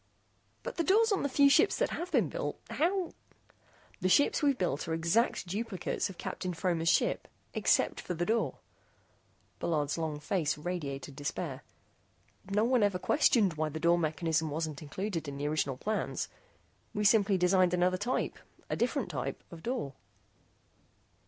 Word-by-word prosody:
"But - - -6
the 335 - +2
doors 435 +5 +4
on 400 - +2
the 285 - 0
few 280 +2 +5
ships 280 - +5
that - - +1
have 355 +2 -4
been - - +3
built. - - -4
How 355 +2 0 0.4
" - - -30
"The 185 - +2
ship's 285 +9 +4
we've 280 -3 +3
built 165 - -1
were 160 - 0
exact 170 +7 +1
duplicates 200 +1 -2
of 190 - -10
Captain 180 -2 -4
Fromer's 165 -1 +1
ship - - +2 0.3
except - - +2
for 180 - -4
the 175 +1 -1
door." 225 +3 0 1.0
Bullard's 150 -2 0
long 155 -2 -2
face 155 -1 0
radiated 145 -5 -4
despair. 145 0 -4 0.9
"No 210 +2 +2
one 245 0 +3
ever 205 -3 +2
questioned 220 - +3
why 155 0 -1
the 160 +1 -5
door 170 +1 +4
mechanism 160 0 0
wasn't 155 -1 -3
included 165 +2 -4
in 140 0 -5
the 145 +1 -2
original 145 -3 0
plans. 215 +9 -2 0.7
We 210 - 0
simply 205 -2 +4
designed 180 0 +3
another 180 +1 +2
type 240 +7 -2 0.3
a - - +1
different 240 -5 -1
type - - -4
of 165 -2 -10
door." 235 - -3
180 Hz, 160 wpm, -31 LUFS, 160-230 Hz, 1.0 s, few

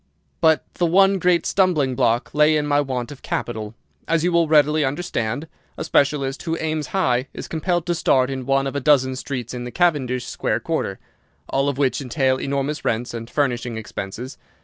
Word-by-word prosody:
"But 160 -2 +4
the 175 - +1
one 195 +3 +4
great 180 -1 +2
stumbling 165 -9 +2
block 120 -1 +1
lay 150 +1 +4
in 150 - 0
my 145 0 +2
want 130 -2 -3
of 140 - -11
capital. 110 -2 -4 0.3
As 165 -1 +1
you 180 - +2
will 170 -1 +3
readily 150 0 +4
understand, 140 -2 -2 0.3
a - - -3
specialist 140 -3 +1
who 165 -1 -2
aims 155 -3 -2
high 130 -7 +1
is - - -6
compelled 175 +1 -1
to 175 - 0
start 130 -5 +2
in 130 -1 -5
one 135 0 +2
of 135 - -4
a - - +1
dozen 130 -2 +3
streets 130 -3 -5
in 125 -1 -5
the 125 - -5
Cavendish 130 -6 +1
Square - - -2
quarter, - - -2 0.5
all 135 +1 +1
of 140 - -3
which 140 0 +1
entail 130 0 +1
enormous 140 +2 -2
rents 120 +2 -1
and 115 0 -6
furnishing 120 -5 -1
expenses. 110 +4 -6
140 Hz, 190 wpm, -22 LUFS, 125-160 Hz, 0.5 s, But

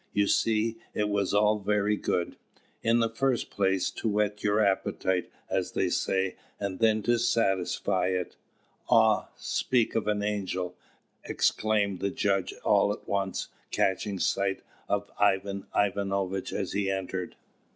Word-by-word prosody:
You 100 0 +3
see, 110 +2 +1 0.2
it 105 0 0
was 100 -2 0
all 105 +1 +3
very 105 +1 +1
good. 90 -4 -1 0.5
In 115 +1 +3
the 115 - +2
first 130 +1 0
place, 95 -2 +1
to 115 - -2
whet 105 0 0
your 105 0 +2
appetite, 95 -2 +1 0.2
as - - -1
they - - +1
say, 95 -1 0 0.2
and 100 -2 -3
then 110 -2 +3
to 120 +1 +2
satisfy 95 -5 +1
it 90 -1 -2 0.5
Ah! - - +4
speak 125 -3 0
of 110 -2 -1
an 105 -1 +1
angel," 95 -3 -2 0.5
exclaimed 105 -3 +1
the 100 - 0
judge, 100 -1 0
all 100 - +4
at 105 - -7
once, 100 -1 -2 0.2
catching 95 +1 0
sight 95 +1 0 0.3
of 100 0 -1
Ivan 100 -1 +1
Ivanovitch 100 -1 0
as 95 - -3
he 100 -1 0
entered. 95 -1 -3
100 Hz, 140 wpm, -28 LUFS, 95-105 Hz, 0.5 s, Ah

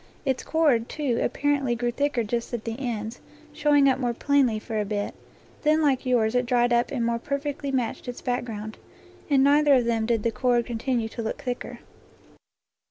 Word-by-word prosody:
Its 265 -2 0
cord, 290 -8 +2
too, 275 -6 -1
apparently 280 -1 0
grew 240 +1 -1
thicker 280 -1 0
just 235 +2 -3
at 225 - -7
the 225 -1 -3
ends, 230 -3 -4 0.3
showing 295 -2 +4
up 265 -1 +2
more 240 -2 -1
plainly 275 -4 +2
for 220 0 -4
a - - +1
bit; 205 0 -3 0.5
then 305 +1 +3
like 275 -4 +1
yours 230 -3 +2
it 250 -1 +1
dried 240 0 +2
up 240 +1 +2
and 240 -4 -1
more 235 0 0
perfectly 280 +2 -3
matched 250 -1 -2
its 245 - -5
back 245 -1 -1
ground. 215 -2 -7 0.5
In 275 -2 +4
neither 290 0 +5
of 250 -2 +2
them 225 -1 0
did 230 -3 +1
the 230 - +1
cord 240 -1 +1
continue 235 0 -1
to 230 - -6
look 220 - -4
thicker. 250 -2 -5
245 Hz, 190 wpm, -25 LUFS, 230-280 Hz, 0.5 s, neither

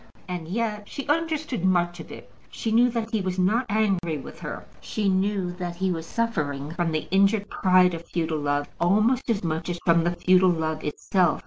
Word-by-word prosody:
And 175 -3 -5
yet 210 +1 -3
she 280 - -6
understood 305 - -1
much 175 -2 +1
of - - -9
it. - - -11 0.2
She 225 - -3
knew 240 +2 +5
that 230 -1 -3
he 220 -3 0
was 185 -1 -3
not 215 +7 +2
angry 195 -7 +1
with 135 - -10
her. - - -6
She 210 -2 -2
knew 190 -1 0
that 175 -1 -4
he 190 +1 0
was 165 -2 -4
suffering 150 -11 -2
from 170 -1 -1
the 155 -1 -2
injured 200 +2 +3
pride 185 -1 +4
of 165 0 -5
futile 160 -2 -1
love, 145 0 0
almost 215 +9 +2
as 215 -4 0
much 165 +1 -2
as 175 - -2
from 170 -1 +4
the 175 +1 0
futile 185 +1 +4
love 160 -2 -1
itself. 175 +3 +1
185 Hz, 200 wpm, -25 LUFS, 170-215 Hz, 0.2 s, knew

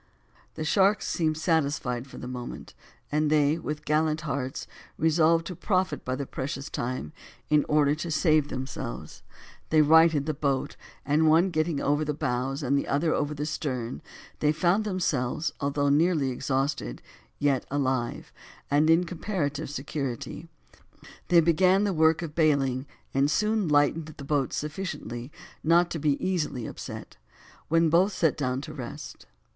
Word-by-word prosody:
The 155 - -4
sharks 200 +5 +3
seemed 155 -2 0
satisfied 140 -6 0
for - - -12
the 125 - -7
moment, 125 -1 -7 0.4
and 150 0 +1
they, 150 +1 +3
with 150 -1 -5
gallant 155 +1 +1
hearts, 140 -3 -3 0.3
resolved 160 +1 +3
to 180 - -6
profit 185 +1 -1
by 130 - -2
the 140 +1 -4
precious 135 +2 -5
time 120 -11 -4 0.4
in 150 -1 +5
order 150 -1 +4
to 155 +3 -4
save 155 -2 +3
themselves; 130 - -6 0.5
they 155 -1 +5
righted 160 -1 +5
the 155 - -1
boat, 140 -2 -1 0.3
and 155 +2 +3
one 170 +4 +4
getting 155 -2 0
over 145 +2 +1
the 150 -1 -2
bows, 135 0 -2
and 135 +1 +1
the 140 - 0
other 155 +3 +1
over 150 0 -1
the 145 +1 -3
stern, 130 -6 -3 0.4
they 150 - +3
found 180 +6 +1
themselves 165 -7 -1
although 145 0 +1
nearly 150 -2 +2
exhausted, 130 - -2 0.3
yet 140 -3 +1
alive, 130 -4 -2 0.4
and 150 +2 +4
in 165 +2 +5
comparative 160 -5 -3
security, 140 +1 -5 0.8
they 170 -1 +6
began 185 +4 +4
the 200 -2 +1
work 160 +1 +3
of 155 -3 -6
bailing, 140 -4 +1 0.3
and 135 +1 +2
soon 210 +2 +1
lightened 150 +2 +2
the - - -8
boat 140 -2 0
sufficiently 150 -6 -5 0.3
not 170 +2 +4
to 165 - -3
be 145 -1 +1
easily 155 -10 -1
upset, - - -8 0.5
when 165 0 +3
both 175 +6 +4
set 160 -5 +2
down 130 -2 -2
to - - -8
rest. - - -8
150 Hz, 150 wpm, -27 LUFS, 140-165 Hz, 0.8 s, they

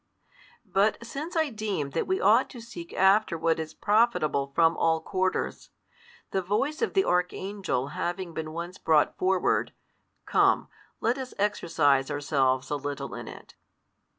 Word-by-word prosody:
But 200 +2 +2
since 295 +9 -6
I 315 -3 +1
deem 205 -10 -3
that - - -1
we 375 +1 0
ought - - +4
to 250 - -10
seek 225 -8 -9
after 190 -1 +3
what 165 0 +1
is 160 0 -6
profitable 205 -10 +2
from 165 0 +4
all 160 -1 +2
quarters; 185 +3 -2 0.6
the 190 - 0
voice 215 - -1
of 455 - -1
the 385 - +4
archangel 180 -5 -1
having 175 +3 -4
been 155 -1 -5
once 170 +3 -6
brought 155 -2 +3
forward, 185 0 +1 0.5
come, - - +3 0.3
let 240 +4 +1
us 260 -1 -7
exercise 155 -9 +2
ourselves 140 -3 0
a 145 - +1
little 145 0 -5
in - - -7
it. - - -11
180 Hz, 150 wpm, -27 LUFS, 155-215 Hz, 0.6 s, ought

